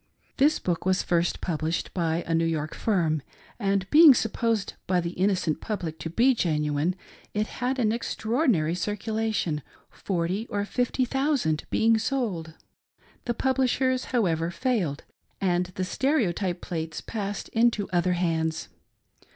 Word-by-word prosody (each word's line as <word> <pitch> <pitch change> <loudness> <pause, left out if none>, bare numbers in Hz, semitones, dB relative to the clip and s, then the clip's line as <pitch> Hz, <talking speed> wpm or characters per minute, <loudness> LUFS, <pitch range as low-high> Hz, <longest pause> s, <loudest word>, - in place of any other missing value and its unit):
This 295 +3 +4
book 175 -2 -2
was 185 0 +1
first 170 0 0
published 160 -1 -2
by 170 -1 0
a 165 - -1
New 165 0 +2
York 155 -2 -2
firm, 165 -8 +1 0.4
and 195 -2 0
being 305 -3 +9
supposed 225 -2 0
by 180 -1 +2
the 170 0 -2
innocent 185 -4 0
public 170 -7 -4
to 165 - -4
be 245 +10 +4
genuine, 150 - 0 0.4
it 210 0 +1
had 255 +4 -2
an 225 -4 +2
extraordinary 225 - 0
circulation 210 -3 -1 0.2
— - - -36
^forty 190 +4 -2
or 205 0 -1
fifty 250 +3 0
thousand 270 - 0
being 225 0 +3
sold. 210 - -2 0.7
The 240 - -1
publish 260 -1 +1
ers, 260 -1 +1
however, 170 -9 0
failed, 180 - -1 0.4
and 180 -2 +1
the 185 - -1
stereotype 195 - 0
plates 160 -2 -4
passed 205 -2 -4
into 225 -3 +2
other 180 0 +2
hands. 160 -2 -1
190 Hz, 140 wpm, -26 LUFS, 165-230 Hz, 0.7 s, being